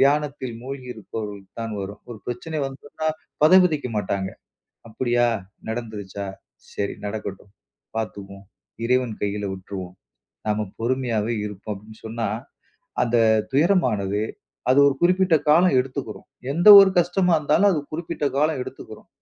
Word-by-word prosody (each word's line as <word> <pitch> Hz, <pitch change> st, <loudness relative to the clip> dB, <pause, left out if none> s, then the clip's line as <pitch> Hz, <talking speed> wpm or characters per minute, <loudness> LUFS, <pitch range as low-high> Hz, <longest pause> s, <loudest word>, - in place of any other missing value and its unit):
தியானத்தில் 140 Hz, -3 st, +1 dB
மூழ்கியிருப்பவர்களுக்கு 110 Hz, -6 st, -7 dB
தான் 115 Hz, -1 st, -4 dB
வரும். 100 Hz, +1 st, -7 dB
ஒரு 115 Hz, -, -7 dB
பிரச்சினை 135 Hz, +6 st, -4 dB
வந்துட்னா, 145 Hz, +3 st, -5 dB, 0.4 s
பதைபதைக்க 160 Hz, -5 st, +5 dB
மாட்டாங்க, 95 Hz, -1 st, -1 dB, 0.6 s
அப்படியா 120 Hz, +1 st, +1 dB, 0.4 s
நடந்துருச்சா, 105 Hz, -4 st, -5 dB, 0.5 s
சரி 100 Hz, -, -2 dB
நடக்கட்டும் 100 Hz, -2 st, -6 dB, 0.5 s
பாத்துக்குவோம், 100 Hz, -2 st, -6 dB, 0.4 s
இறைவன் 125 Hz, -2 st, +1 dB
கையில 105 Hz, 0 st, -1 dB
விட்ருவோம். 95 Hz, -1 st, -7 dB, 0.5 s
நாம 105 Hz, 0 st, 0 dB
பொறுமையாவே 120 Hz, -2 st, 0 dB
இருப்போம் 105 Hz, +1 st, -6 dB
அப்டின் 110 Hz, +2 st, -14 dB
சொன்னா, 115 Hz, 0 st, -2 dB, 0.8 s
அந்த 120 Hz, 0 st, +1 dB, 0.4 s
துயரமானது 125 Hz, -, +2 dB, 0.5 s
அது 130 Hz, -, +5 dB
ஒரு 140 Hz, -, +3 dB
குறிப்பிட்ட 180 Hz, -1 st, +4 dB
காலம் 170 Hz, -1 st, +5 dB
எடுத்துகுரும். 130 Hz, -4 st, -6 dB, 0.3 s
எந்த 175 Hz, +7 st, +4 dB
ஒரு 195 Hz, -1 st, +6 dB
கஷ்டமாருந்தாலும், 175 Hz, +1 st, +3 dB
அது 155 Hz, -, 0 dB
குறிப்பிட்ட 165 Hz, -1 st, -3 dB
காலம் 150 Hz, -2 st, +2 dB
எடுத்துகுரும். -, -, -10 dB
120 Hz, 110 wpm, -23 LUFS, 105-150 Hz, 0.8 s, ஒரு